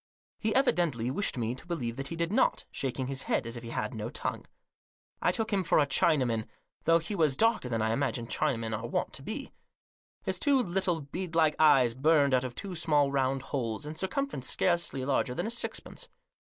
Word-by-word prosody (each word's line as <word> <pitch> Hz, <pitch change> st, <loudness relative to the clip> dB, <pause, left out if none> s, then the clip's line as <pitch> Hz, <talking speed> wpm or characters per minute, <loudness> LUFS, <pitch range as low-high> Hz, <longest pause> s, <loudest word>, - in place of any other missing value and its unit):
He 220 Hz, 0 st, 0 dB
evidently 165 Hz, -, +2 dB
wished 195 Hz, 0 st, -1 dB
me 115 Hz, 0 st, -1 dB
to 130 Hz, -, -10 dB
believe 125 Hz, -10 st, -3 dB
that 135 Hz, 0 st, -4 dB
he 165 Hz, -, -5 dB
did 170 Hz, +1 st, -1 dB
not, 260 Hz, -, +2 dB
shaking 130 Hz, -1 st, -3 dB
his 135 Hz, +1 st, -3 dB
head, -, -, +1 dB
as 115 Hz, +1 st, -4 dB
if 120 Hz, -, -6 dB
he 115 Hz, -, -8 dB
had 105 Hz, +1 st, -3 dB
no 110 Hz, 0 st, -4 dB
tongue. 140 Hz, -, -4 dB, 0.7 s
I -, -, +3 dB
took 225 Hz, -1 st, -2 dB
him 195 Hz, -2 st, +2 dB
for 160 Hz, -, +2 dB
a 150 Hz, -, +5 dB
Chinaman, 130 Hz, -7 st, +2 dB, 0.4 s
though 165 Hz, +1 st, +6 dB
he 170 Hz, +5 st, -4 dB
was 155 Hz, -8 st, +2 dB
darker 225 Hz, -, +2 dB
than 115 Hz, -2 st, 0 dB
I 110 Hz, -, +1 dB
imagine 120 Hz, -2 st, -1 dB
Chinamen 115 Hz, -4 st, -1 dB
are 110 Hz, +2 st, -4 dB
wont -, -, -2 dB
to -, -, -3 dB
be. 245 Hz, -, -5 dB, 0.7 s
His -, -, -1 dB
two 280 Hz, -2 st, +4 dB
little 180 Hz, -6 st, 0 dB
bead 170 Hz, +4 st, -6 dB
like 155 Hz, -2 st, +4 dB
eyes 135 Hz, -6 st, +5 dB
burned 140 Hz, +1 st, +3 dB
out 130 Hz, 0 st, +3 dB
of 125 Hz, -2 st, -5 dB
two 195 Hz, +5 st, -4 dB
small 150 Hz, -4 st, +2 dB
round 135 Hz, -1 st, 0 dB
holes, 120 Hz, -1 st, -2 dB
in 150 Hz, -, -5 dB
circumference 190 Hz, -, -2 dB
scarcely 170 Hz, -7 st, +1 dB
larger 130 Hz, -2 st, 0 dB
than -, -, -2 dB
a 225 Hz, -, -1 dB
sixpence. 235 Hz, -, -4 dB
140 Hz, 210 wpm, -30 LUFS, 125-175 Hz, 0.7 s, though